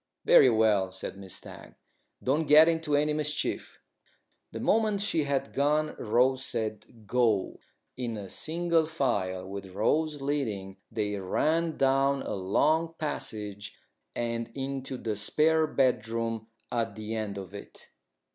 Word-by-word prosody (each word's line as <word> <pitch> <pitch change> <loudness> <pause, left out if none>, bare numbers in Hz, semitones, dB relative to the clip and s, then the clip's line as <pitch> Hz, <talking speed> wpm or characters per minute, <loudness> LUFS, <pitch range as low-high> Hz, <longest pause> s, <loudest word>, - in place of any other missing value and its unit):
"Very 130 - +7
well," 110 -4 +3
said 95 +1 -6
Miss 95 -2 -8
Stagg. - - -10 0.5
"Don't 150 +4 +1
get 155 +2 +8
into 160 -3 +1
any 150 +1 +2
mischief." 150 0 -2 0.7
The - - -6
moment 215 -2 +2
she 180 -7 +1
had 140 -1 -1
gone 150 +2 +1
Rose 125 +4 +2
said 110 -1 -5
"Go!" 110 -3 +1 0.4
In 115 -5 -4
single 165 - 0
file, 95 - -1
with 95 -1 -8
Rose 150 +8 +1
leading, 110 -10 -2
they 105 -2 -2
ran 160 - 0
down 135 0 +2
a - - -4
long 155 - +1
passage 105 -9 -5 0.4
and 115 -1 -2
into 135 -1 -4
the 110 -3 -3
spare 155 +9 +2
bedroom 115 -4 0 0.2
at 115 -3 -1
the 110 0 -5
end 105 -3 -3
of 95 0 -8
it. 100 - -11
125 Hz, 130 wpm, -29 LUFS, 105-150 Hz, 0.7 s, get